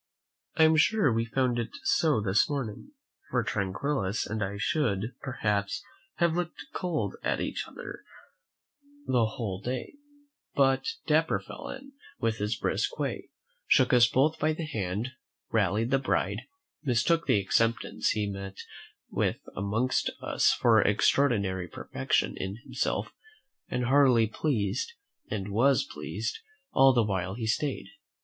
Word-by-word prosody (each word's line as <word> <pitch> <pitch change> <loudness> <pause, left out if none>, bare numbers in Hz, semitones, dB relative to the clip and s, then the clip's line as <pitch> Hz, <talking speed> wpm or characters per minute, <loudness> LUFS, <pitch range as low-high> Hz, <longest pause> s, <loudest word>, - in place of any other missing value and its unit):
I 160 - +5
am 160 0 +5
sure 155 - +4
we 115 +1 +1
found 125 0 0
it 115 - -2
so 150 -9 +3
this 100 -1 +2
morning; 135 - -4 0.4
for 125 -2 +1
Tranquillus 105 0 -1
and 110 0 -2
I 100 +1 -3
should, 110 -2 0
perhaps, 105 -6 -1 0.3
have 170 -1 +2
looked 175 -1 -3
cold 155 - -2
at - - 0
each - - -3
other - - -9 1.0
the 120 -3 +3
whole 105 -4 -4
day, 125 +3 -4 0.6
but 135 -1 +3 0.2
Dapper - - +2
fell - - -9
in, 275 +1 -8 0.3
with 115 -1 0
his 105 +2 0
brisk - - -1
way, - - -3 0.4
shook 130 -1 +4
us 120 -1 +7
both 150 +6 +2
by 155 +1 +2
the 160 +1 -4
hand, 105 -4 -2 0.4
rallied 110 +3 +1
the 135 - +4
bride, 130 - 0 0.4
mistook 145 +5 +1
the 105 - +4
acceptance 115 +4 +1
he 105 -1 0
met 95 -1 -6 0.5
with - - 0 0.2
amongst 110 +6 0
us - - +2
for 115 -3 +4
extraordinary 100 -5 +2
perfection - - -1
in 95 +1 -3
himself, - - -2 0.6
and 125 0 -1
heartily 130 -3 +5
pleased, 110 - -1 0.4
and 100 -2 -3
was 130 +7 +4
pleased, 445 +9 -5 0.3
all 135 0 +6
the 120 -3 +3
while 95 -2 -2
he 115 - -4
stayed. 135 +5 -1
115 Hz, 140 wpm, -29 LUFS, 105-140 Hz, 1.0 s, us